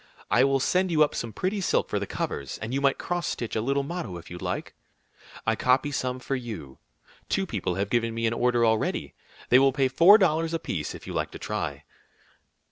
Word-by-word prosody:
I - - +5
will 135 0 +3
send 185 +7 +1
you 155 -3 +5
up 150 - 0
some 115 - -4
pretty 190 - -2
silk - - +1
for - - -1
the - - -4
covers, 70 -2 -4
and 110 +3 -5
you 140 - 0
might 140 -1 +3
cross 175 -1 -2
stitch 120 - -3
a 110 - +1
little 140 +4 0
motto 140 - -5
if 85 - -12
you 90 - -7
liked. - - -4 0.7
I - - +2
copy 130 +3 +2
some 130 -2 -2
for 135 - -2
you. 105 - -7 0.5
Two 195 - +1
people 95 - -2
have 100 +2 -2
given 115 -1 +1
me 115 0 -1
an 115 - +1
order 120 0 +2
already. 110 -1 0 0.4
They 125 - +7
will 135 0 +5
pay 135 0 +2
four 170 +10 +7
dollars 165 -4 +1
apiece 85 - -3
if - - -11
you - - -6
like - - -1
to - - -9
try." - - -4
130 Hz, 215 wpm, -26 LUFS, 115-155 Hz, 0.7 s, They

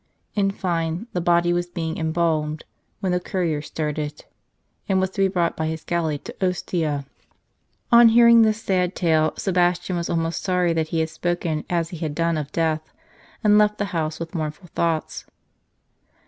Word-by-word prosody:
In 200 -2 +2
fine, 170 -1 -2
the 180 - -1
body 175 0 +3
was 175 0 -1
being 165 -2 -4
em 160 -1 -1
balmed 155 -2 0 0.4
when 190 -3 0
the 180 - +1
courier 175 -5 -1
started, 150 -1 -4 0.6
and 190 -1 +3
was 190 0 0
to 195 - -3
be 195 - +5
brought 175 -3 0
by 160 - -2
his 160 0 -4
galley 165 -3 -1
to - - -10
Ostia. 165 -5 -1 0.9
On 235 -1 +8
hearing 235 0 +7
this 220 0 +2
sad 180 -1 0
tale, 155 -3 +2
Sebastian 180 -1 +1
was 170 - -3
almost 165 0 -1
sorry 180 -2 +1
that 160 -1 0
he 160 0 0
had 160 - -1
spoken 165 -2 -2
as 170 -2 0
he 175 - -7
had 155 -2 -4
done 170 0 +1
of 150 -1 -6
death, 160 -1 -1 0.5
and 210 0 +6
left 210 0 +3
the 205 - -1
house 155 -2 -2
with 165 +1 -6
mournful 160 +1 -5
thoughts. 165 -2 -1
170 Hz, 175 wpm, -23 LUFS, 160-185 Hz, 0.9 s, On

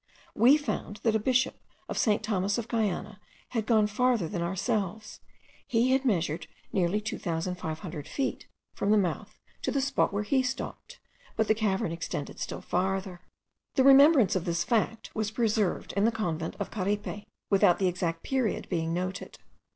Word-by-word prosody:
We 255 +6 +6
found 290 -8 -4
that 225 - +3
a - - +3
bishop 255 +3 +1 0.3
of - - -4
St. 210 -2 +2
Thomas 200 -1 0
of 235 -1 -3
Guiana 215 -3 -2 0.3
had 225 -3 -2
gone 220 -3 +4
farther 225 -2 +1
than 175 0 -3
ourselves. 210 +3 -2 0.5
He 240 +2 +2
had 265 +1 +2
measured 170 - 0 0.3
nearly 185 +2 +2
2500 165 -5 -4
feet 270 - -3 0.3
from 200 - -2
the 215 - +5
mouth 195 +2 -2 0.2
to - - -1
the 280 - 0
spot 275 +1 +1
where 200 +1 -1
he 265 +5 +2
stopped, 265 - -5 0.4
but 220 -1 +1
the - - +5
cavern 205 -6 0
extended 165 -3 -5
still - - -4
farther. 190 0 -2 0.5
The 265 - +4
remembrance 275 - +7
of 185 - -1
this 170 0 0
fact 225 +2 -1
was 215 -1 -1
preserved 215 -4 0
in 200 +2 +2
the 230 - +4
convent 170 -8 -3
of - - -4
Caripe, 205 0 -3 0.2
without 190 -3 +5
the 190 - +1
exact 170 -2 -2
period 260 -5 -1
being 165 -2 -1
noted. 185 +2 -4
205 Hz, 165 wpm, -28 LUFS, 180-230 Hz, 0.5 s, remembrance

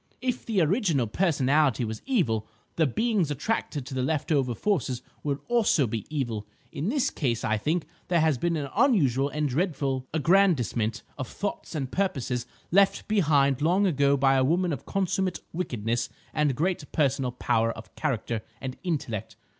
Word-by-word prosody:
If 250 0 -3
the 215 -5 +2
original 165 - +2
personality 140 - +2
was 110 0 -5
evil, 115 - +1 0.3
the 160 -2 +3
beings 210 - +1
attracted 145 - -2
to 135 - -8
the 130 - -1
left 155 +4 -1
over 130 -5 +2
forces 130 - -1 0.2
will 145 -1 -2
also 230 - +3
be 110 -1 -4
evil. 120 -9 -3 0.2
In 155 +8 -2
this 275 +1 +1
case, 120 -6 -1
I 110 0 +1
think 155 +8 0 0.2
there 175 -1 +2
has 155 -5 +2
been 170 +3 +1
an 140 -2 -3
unusual 140 - +3
and 150 0 -1
dreadful 135 -3 -1
aggrandisement 145 - +2 0.2
of 130 - -3
the - - -13
thoughts 200 -4 -4
and 135 -4 -3
purposes 130 -10 -1 0.2
left 195 +2 +3
behind 145 -10 +3
long 180 +6 +3
ago 140 -5 +3
by 135 0 +4
a 130 -1 +3
woman 170 +4 +2
of - - -7
consummate 190 -1 0
wickedness 120 - -2 0.2
and 150 -4 +1
great 165 0 -1
personal 135 -3 +1
power 115 -2 +1
of 115 - -11
character 115 -6 -2 0.2
and 130 0 -5
intellect. 125 - -3
145 Hz, 165 wpm, -27 LUFS, 125-180 Hz, 0.3 s, by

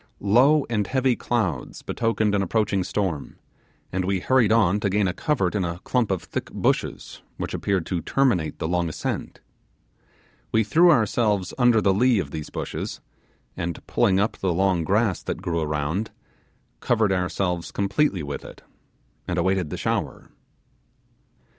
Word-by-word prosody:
Low 140 +5 +5
and 105 -4 -1
heavy 130 -2 +2
clouds 95 - -2
betokened 110 -2 0
an 100 - +2
approaching 100 0 0
storm, 90 -8 -3 0.5
and 95 +1 -1
we 95 0 0
hurried 120 +1 +3
on 105 -3 +3
to 100 -1 0
gain 100 0 +2
a 90 - -1
covert 110 - 0
in 100 -3 0
a 85 0 -3
clump 125 -4 0
of 95 -3 -1
thick - - -5
bushes, - - -2 0.2
which - - -4
appeared 95 -4 -1
to 90 -3 -2
terminate 90 - +1
the - - -3
long 85 0 0
ascent. 75 - -4 1.1
We 110 - +3
threw 165 +13 +5
ourselves 110 - +2
under 120 -3 +5
the 95 - +3
lee 120 +4 +3
of 80 -8 -2
these 75 -1 -6
bushes, - - -5 0.6
and 85 0 -5
pulling 95 -1 +2
up 100 +3 0
the 95 -2 0
long 95 -2 +2
grass 100 +2 +1
that - - -4
grew 85 -1 -1
around, 75 +7 -2 0.7
covered 110 -4 +1
ourselves 90 -1 -1
completely 100 - 0
with 70 -1 -5
it, - - -12 0.6
and - - -2
awaited 95 -4 +1
the - - -5
shower. - - -3
100 Hz, 155 wpm, -24 LUFS, 90-115 Hz, 1.1 s, Low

